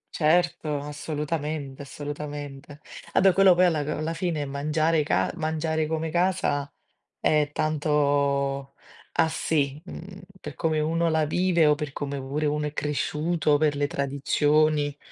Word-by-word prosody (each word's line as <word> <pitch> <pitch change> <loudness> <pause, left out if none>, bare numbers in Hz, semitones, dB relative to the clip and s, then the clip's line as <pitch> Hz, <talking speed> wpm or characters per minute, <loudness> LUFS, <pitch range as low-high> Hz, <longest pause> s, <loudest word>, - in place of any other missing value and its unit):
Certo, 160 -2 +2
assolutamente, 150 -1 -4
assolutamente. 145 0 -7 0.3
A - - +4
beh, 190 -1 +5
quello 190 0 +6
poi 180 +1 +5
a - - +5 0.3
alla 155 +2 -2
fine 165 -4 -2
mangiare 155 +3 +1
ca 150 - +1
mangiare 160 -1 -1
come 160 0 -2
casa 170 -5 0 0.5
è 150 -1 +2
tanto 140 -3 0 0.4
a 165 - +4
si, 145 -3 0
mhmm, 185 +1 -9 0.2
per 150 -3 -7
come 155 +1 0
uno 165 +2 +1
la 160 -1 +2
vive 175 -1 +3
o 150 - +5
per 150 -1 -5
come 140 -1 -4
pure 140 +3 -2
uno 150 0 -1
è 150 - -4
cresciuto, 150 +2 0
per 150 -1 +2
le 145 0 +1
tradizioni. 145 +1 +1
150 Hz, 140 wpm, -26 LUFS, 145-160 Hz, 0.5 s, quello